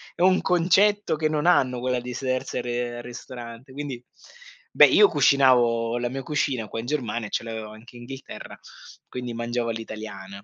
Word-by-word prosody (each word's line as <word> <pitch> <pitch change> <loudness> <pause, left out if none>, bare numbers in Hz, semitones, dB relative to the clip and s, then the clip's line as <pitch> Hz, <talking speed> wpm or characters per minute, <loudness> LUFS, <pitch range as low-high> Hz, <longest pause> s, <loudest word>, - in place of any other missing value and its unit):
è - - -6
un 185 +1 +5
concetto 190 +3 +3
che 155 0 0
non 155 +1 -1
hanno 130 -8 +3
quella 125 0 0
di 125 +1 -6
sedersi 125 -1 -2
a 120 - -8
r - - -7
al 120 - -7
ristorante 120 +1 -9
quindi 140 -4 -6 0.7
beh - - +8
io 415 - +6
cucinavo 120 - +3
la 120 0 -1
mia 135 +1 -5
cucina 135 -6 -1
qua 115 - -5
in 115 - -5
Germania 120 -6 -2
e - - -12
ce - - -2
l'avevo 110 -2 -6
anche 110 +3 -14
Inghilterra, 130 +2 -9 0.5
quindi 125 -1 -6
mangiavo 120 0 -2
all'italiana. 105 -3 -7
125 Hz, 180 wpm, -25 LUFS, 115-140 Hz, 0.7 s, beh